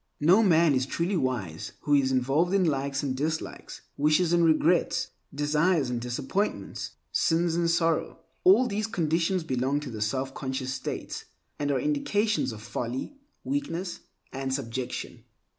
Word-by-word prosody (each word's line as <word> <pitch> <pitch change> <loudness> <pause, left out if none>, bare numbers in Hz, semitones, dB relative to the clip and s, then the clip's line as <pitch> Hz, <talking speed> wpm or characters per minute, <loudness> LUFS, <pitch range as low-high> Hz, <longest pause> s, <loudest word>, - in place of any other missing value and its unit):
No 175 +9 +6
man 170 -6 +5
is 130 0 +1
truly 170 +7 -1
wise 120 - -2
who 145 - 0
is 135 -2 +4
involved 140 +9 +2
in 195 - +4
likes 140 -2 0
and 135 -2 -1
dislikes, 155 +4 -4 0.2
wishes 155 +4 +3
and 170 0 +4
regrets, 165 +2 +3 0.2
desires 150 0 +1
and 120 -1 -2
disappointments, 130 - -2 0.2
sins 165 0 +2
and 170 0 +1
sorrow. 165 -1 +1 0.3
All 365 -8 +6
these 215 -1 -1
conditions 170 -1 0
belong 135 0 0
to 140 -4 -6
the 110 - -6
selfconscious 130 +3 -2
state, 130 - -4 0.4
and 145 0 -1
are 140 - +2
indications 225 - +1
of 110 -1 -9
folly, 125 - -4 0.2
weakness, 195 -11 -3 0.3
and 135 0 -3
subjection. 130 -2 -4
150 Hz, 140 wpm, -27 LUFS, 130-175 Hz, 0.4 s, No